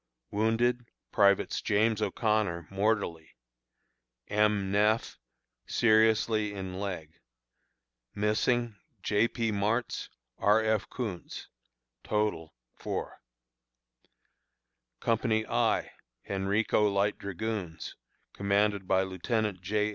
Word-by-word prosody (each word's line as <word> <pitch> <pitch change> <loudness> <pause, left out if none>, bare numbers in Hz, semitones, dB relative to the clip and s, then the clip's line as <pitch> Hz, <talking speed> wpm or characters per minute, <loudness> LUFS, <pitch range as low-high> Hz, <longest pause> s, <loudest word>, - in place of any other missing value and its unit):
Wounded: 115 +3 +1 0.2
Privates 100 -1 +3
James 110 +1 +2
O'Connor, 105 -7 0
mortally; 100 -5 -1 0.9
M. 105 -2 +2
Neff, 105 +3 +1 0.5
seriously 110 -1 +3
in 95 -1 -5
leg. 90 -6 -4 1.0
Missing: 110 +2 +1 0.3
J. 105 +2 +3
P. 115 -2 -2
Martz, 105 +4 -1 0.3
R. 105 +2 +4
F. 110 -2 0
Koontz. 105 -9 -6 0.5
Total, 105 -7 -1 0.3
4. - - -5 1.8
Company 110 -1 +1
I - - +1 0.4
(Henrico 100 +2 +1
Light 100 +1 +1
Dragoons), 100 -4 -4 0.4
commanded 100 -1 +1
by 95 0 +3
Lieutenant 95 +1 -2
J. 105 +3 0
105 Hz, 85 wpm, -29 LUFS, 100-110 Hz, 1.8 s, R